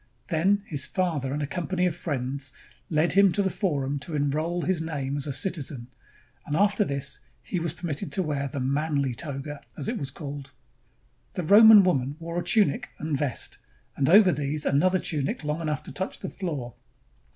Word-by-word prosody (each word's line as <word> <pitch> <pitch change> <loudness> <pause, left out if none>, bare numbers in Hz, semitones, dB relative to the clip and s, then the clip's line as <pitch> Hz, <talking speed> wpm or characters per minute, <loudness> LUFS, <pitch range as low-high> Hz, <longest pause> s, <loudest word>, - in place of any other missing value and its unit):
Then 195 +5 +2
his 145 -4 +1
father 160 -8 -1
and 145 +1 -2
a - - 0
company 180 +4 -1
of 175 -3 0
friends 140 -4 -2 0.4
led 160 +1 +3
him 195 0 +6
to 200 - +2
the 190 - 0
forum 145 -7 -1
to 155 +3 -6
enroll 155 +4 0
his 185 -3 0
name 145 -4 -3
as 145 0 -3
a - - -1
citizen, 140 -6 -3 0.5
and 145 - -3
after 205 +3 +3
this 140 -4 -3 0.2
he 180 - -2
was 165 -1 -2
permitted 170 0 -4
to 190 - +1
wear 145 -3 -2
the 135 +1 -5
"manly 140 0 0
toga," 145 +1 -6 0.2
^s 140 - -5
it - - -2
was 140 - -3
called. 140 -1 -7 0.8
The 180 - -3
Roman 210 +3 +9
woman 140 -6 +1
wore 170 +1 -4
a - - -3
tunic 210 -11 +2
and 155 0 -2
vest, 135 -3 -3 0.4
and 140 0 +1
over 195 +1 +7
these 145 0 -2
another 180 +7 +3
tunic 150 -4 -2
long 150 +2 -2
enough 155 -2 -2
to - - -8
touch 190 +1 -4
the - - -4
floor. 145 -11 -5
155 Hz, 185 wpm, -26 LUFS, 140-180 Hz, 0.8 s, Roman